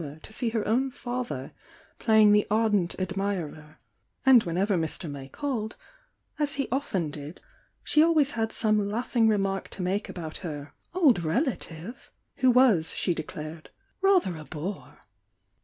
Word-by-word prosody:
our 145 -1 -7
to - - -12
see 235 +1 -1
her 225 -2 -2
own 255 +5 +2
father 250 -1 -5 0.5
playing 220 -2 +5
the 210 0 +4
ardent 210 -4 +2
admir 190 -3 -2
er, 155 0 -16 0.5
and 260 -3 +8
whenever 185 +4 +1
Mr. 165 0 -2
May 140 -2 -7
called, 230 - -3 0.6
as 295 -1 0
he 275 -1 -1
often 190 - -1
did, 145 +3 -8 0.4
she 305 - +3
always 310 -3 +4
had 225 -3 -1
some 215 -2 +1
laughing 230 +1 +1
remark 195 -2 0
to 185 - -6
make 195 +4 -1
about 160 -3 -6
her 145 -5 -7 0.2
"old 285 - +4
relative," 205 - -3 0.3
who 260 - +4
was, 240 -10 +4
she 175 - +1
declared, 155 0 -7 0.3
"rather 380 - +3
a 155 - -8
bore." 165 +8 -7
205 Hz, 150 wpm, -27 LUFS, 165-245 Hz, 0.6 s, and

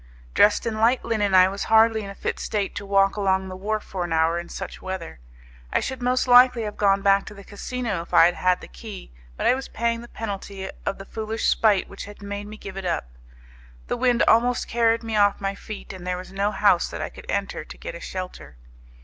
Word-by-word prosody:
Dressed 210 +3 +4
in 220 -2 -2
light 235 +3 +3
linen, 210 -4 +1
I 185 0 +8
was 195 +1 -4
hardly 220 0 +4
in 200 - -7
a 200 - -8
fit - - -3
state 205 -2 -2
to 200 - -6
walk 195 0 +3
along 190 -1 +1
the 185 - -6
wharf 210 +3 -2
for 185 -2 -4
an 175 - -5
hour 165 +1 +2
in 175 - -8
such 190 - -7
weather. 185 - -6 0.5
I - - +2
should 265 -1 -4
most 250 +1 +1
likely 250 -1 +7
have 210 -1 -5
gone 195 -1 +2
back 195 0 +4
to 210 - -9
the 200 - -11
casino 215 -1 -4
if 170 - -12
I - - +7
had 175 - +3
had 180 0 +1
the - - -10
key, - - -10 0.3
but - - -3
I - - +5
was 265 +1 -4
paying 230 0 -1
the 240 - -10
penalty 200 -3 -6 0.2
of 195 - -1
the 195 - -9
foolish 220 +2 -4
spite 210 -4 +3
which 195 - -8
had 205 0 -12
made 205 0 -5
me 215 +1 -9
give 195 -2 -9
it 195 - -5
up. 115 - -2 0.7
The - - -2
wind 245 -1 +2
almost 245 +2 +3
carried 230 0 +2
me 225 -1 -3
off 205 -1 +3
my 195 0 -2
feet, 205 0 -9
and 180 -1 -9
there 180 0 -1
was 185 - -9
no 200 +1 0
house 200 -3 +3
that - - -6
I - - -4
could - - -13
enter - - -2
to - - -12
get - - -7
a - - -8
shelter. 185 - -7
205 Hz, 240 wpm, -24 LUFS, 190-225 Hz, 0.7 s, I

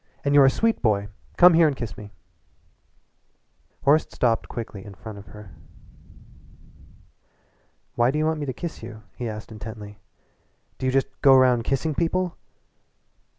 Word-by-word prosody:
"And 140 - +2
you're 140 -2 +7
a - - +7
sweet 225 +10 0
boy. 105 -3 +1 0.3
Come 180 0 +8
here 165 -1 +5
and 145 - -1
kiss 115 -6 -6
me." 105 -1 -11 1.7
Horace 150 +3 +4
stopped 115 -2 0
quickly 110 -4 -7
in 100 -1 -11
front 105 +2 -9
of 100 - -14
her. 105 -2 -12 2.4
"Why 120 +1 +2
do 145 - -1
you 155 - +1
want 160 0 0
me 145 - -4
to - - -1
kiss 170 +6 -7
you?" 115 -1 -10
he 120 -2 -4
asked 105 0 -8
intently, 105 -2 -9 0.8
"Do 130 - -2
you - - +2
just 135 0 -1
go 135 -1 +7
round 125 -3 +4
kissing 150 +3 -1
people?" 175 +3 -1
125 Hz, 155 wpm, -24 LUFS, 110-150 Hz, 2.4 s, Come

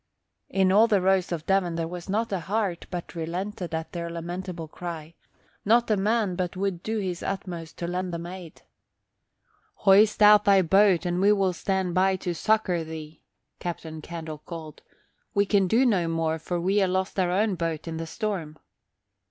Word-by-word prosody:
In 190 -1 +2
all 215 +4 +6
the 210 -4 +3
Rose 190 -1 +2
of 165 -2 -3
Devon 190 -3 +1
there 165 -1 -2
was 175 +2 -8
not 220 +3 0
a 190 - 0
heart 195 -1 -2
but 175 -2 -6
relented 175 +1 -4
at 160 0 -5
their 170 -1 -4
lamentable 170 0 -5
cry, 165 -1 -7 0.5
not 230 +2 +3
a - - +5
man 205 -1 +1
but 180 0 -3
would 190 -3 -2
do 220 +3 -2
his 185 -4 -3
utmost 175 -4 -5
to 170 - -4
lend 180 +1 -2
them 170 0 -5
aid. 175 -2 -10 1.2
"Hoist 210 +2 +6
out 210 0 +8
thy 195 -2 +5
boat 190 +1 +4
and 175 +1 0
we 200 +1 +5
will 195 -3 +2
stand 190 0 -1
by 190 +2 +3
to 180 -1 -3
succour 185 -2 +1
thee," 160 -1 -9 0.4
Captain 160 -2 -6
Candle 160 -2 -7
called. 160 -1 -9 0.5
"We 200 0 +4
can 195 -2 +2
do 235 +8 +3
no 190 -8 +2
more, 165 -1 -1
for 175 +2 -3
we 190 +4 +2
ha' 195 - +3
lost 190 +1 -1
our 180 -1 +2
own 200 +3 +1
boat 165 -2 -3
in 165 -1 -4
the 165 0 -5
storm." 175 -6 -4
180 Hz, 185 wpm, -26 LUFS, 170-195 Hz, 1.2 s, out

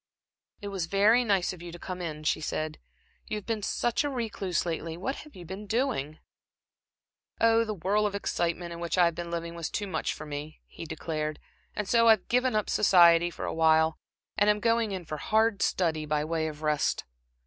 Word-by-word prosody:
"It 205 - -4
was 190 -4 -3
very 210 +6 +4
nice 195 -5 +1
of 175 - -11
you 175 0 -8
to 175 - -9
come 180 +1 -6
in," 155 -3 -5
she 155 - +1
said. 155 0 -3 0.5
"You 215 - -2
have 210 - -8
been 225 -2 -2
such 240 +5 0
a 290 - -1
recluse 215 - -2
lately. 165 -1 -3
What 260 +10 -3
have 300 - -12
you 180 -2 -10
been 190 +5 -7
doing?" 220 - -1 1.2
"Oh, 230 0 +4
the 215 -2 -4
whirl 205 +4 +1
of 200 - -4
excitement 175 -3 -2
in 170 - -8
which 170 +1 -2
I've 170 -2 +4
been 170 +1 -6
living 170 0 -4
was 170 -2 -4
too 210 - -3
much 185 -5 -2
for 155 - -8
me," 150 +1 -7
he - - -9
declared 155 -1 -3 0.4
"and 210 -2 -3
so 230 +1 +4
I've 220 -4 +5
given 250 -1 +2
up 215 - +1
society 175 -4 +5
for - - -6
awhile, 160 0 +3 0.4
and 205 +1 +4
am 210 0 +3
going 230 -1 +1
in 185 -3 -5
for 155 0 -5
hard 220 +3 +1
study 160 -4 0
by 150 0 0
way 160 0 -1
of 155 0 -7
rest." 150 -1 +1
180 Hz, 205 wpm, -28 LUFS, 160-210 Hz, 1.2 s, I've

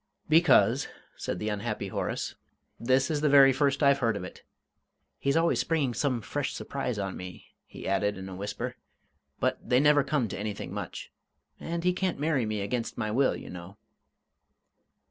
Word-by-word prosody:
"Because," 160 +3 +5 0.3
said - - -4
the 105 +4 -2
unhappy 105 -1 -3
Horace, - - -3 0.5
"this 130 +4 +2
is 150 -2 0
the 150 - +3
very 135 -1 +7
first 140 +1 +1
I've 140 0 +5
heard 115 -5 +1
of 90 - -6
it. 90 - -9 0.8
He's 140 +3 +1
always 165 +1 +2
springing 150 -7 +1
some 130 -2 0
fresh 145 +6 -3
surprise 125 -4 -3
on 100 -2 -3
me," 90 -2 -10
he - - -9
added, 100 +1 +1
in 95 0 -7
a 95 - -7
whisper 100 +2 -4 0.6
"but - - 0
they 125 - +3
never 145 0 +5
come 140 -6 0
to 95 - -5
anything 105 -1 -4
much. - - -6 0.5
And 170 0 -4
he 180 0 +3
can't 185 -1 -1
marry 145 -6 +1
me 105 -1 -2
against 115 +4 -3
my 110 -3 -2
will, 130 +4 +2
you - - -9
know." 90 +3 -9
125 Hz, 175 wpm, -28 LUFS, 105-145 Hz, 0.8 s, very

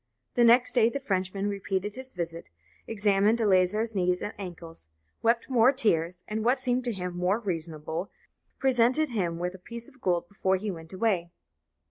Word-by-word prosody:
The 240 - +3
next 240 +2 +5
day 235 -2 +4
the 280 - -4
Frenchman 195 -4 -1
repeated 200 0 -2
his 260 +2 -8
visit, 170 - -5 0.4
examined 210 +1 +2
Eleazar's 210 +2 +3
knees 180 -1 +1
and 210 - -4
ankles, 170 - -9 0.3
wept 230 +1 +2
more 250 -1 +5
tears, 180 - 0
and, 215 +1 -3
what 245 +4 +3
seemed 255 -1 -1
to 240 - 0
him 180 -4 -5
more 180 +3 +1
reasonable, 165 -3 -4 0.5
presented 260 +3 +3
him 180 -8 -1
with 180 +1 -3
a 190 - -11
piece 235 +5 -7
of 255 - -20
gold 175 -2 0
before 190 0 0
he 205 +2 -3
went 165 -2 -9
away. 185 -3 0
200 Hz, 170 wpm, -28 LUFS, 180-235 Hz, 0.5 s, next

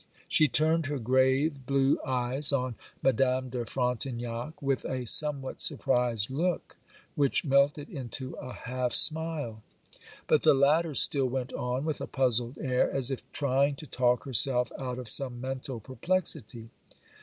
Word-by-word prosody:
She 155 - +5
turned 155 +3 +1
her 145 0 -3
grave, 130 +3 +1
blue 135 0 +2
eyes 130 +3 0
on 130 -3 -1 0.3
Madame 130 0 +1
de 125 -1 -3
Frontignac, 125 +2 -4
with 135 -1 -1
a 130 -1 -4
somewhat 140 +1 +3
surprised 125 -4 +1
look, 170 +6 -2 0.4
which 140 +1 +1
melted 140 +1 +2
into 130 -1 -7
a 130 -3 -8
half 125 0 -4
smile. 155 -8 +2 0.6
But - - +2
the - - +4
latter 150 +3 +2
still 135 -1 +4
went 125 0 -4
on 125 +3 -3
with 155 -2 -3
a - - -4
puzzled 125 -1 -1
air, 130 -3 0
as 135 -1 +1
if 135 - -4
trying 140 0 0
to 155 - -11
talk 125 -2 0
herself 125 -1 +4
out 125 -2 -5
of 125 -2 -6
some 125 0 +1
mental 130 -1 -6
perplexity. 130 - -4
130 Hz, 145 wpm, -28 LUFS, 125-140 Hz, 0.6 s, She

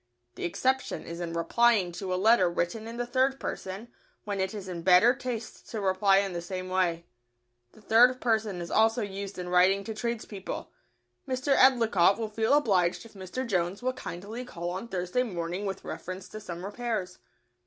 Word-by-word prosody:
The - - -5
exception 260 +9 -1
is 170 +1 -7
in 170 -1 -4
replying 195 +3 +3
to 185 +2 -5
a - - +1
letter 195 -1 +4
written 175 +6 -2
in 230 +1 -7
the 245 - -1
third 260 +2 +1
person, 195 +5 -5 0.3
when 205 -2 -3
it 190 0 0
is 205 -3 -7
in 175 -2 -5
better 185 +7 +6
taste 245 -4 -6
to 225 - -4
reply 195 0 +3
in 195 -1 0
the 170 - -3
same 185 +1 -5
way. 175 -2 0 0.7
The 215 - -19
third 245 +4 +5
person 220 -6 0
is 170 - -6
also 225 +1 +3
used 200 0 -6
in 180 -1 -5
writing 185 +2 +4
to 220 - -5
tradespeople: 220 -3 -5 0.6
"Mr. 260 +2 +1
Edlicott 225 -8 +5
will 225 -2 -3
feel 220 +5 +2
obliged 190 -10 +2
if 230 - -14
Mr. 195 +6 -5
Jones 185 -1 -1
will 255 0 0
kindly 215 +2 -7
call 175 -8 -5
on 190 +6 -5
Thursday 185 +3 -1
morning 180 -3 -3
with 195 -1 -5
reference 185 +1 -6
to 215 - -8
some 175 -3 -7
repairs." 210 -4 -3
200 Hz, 185 wpm, -28 LUFS, 180-235 Hz, 0.7 s, better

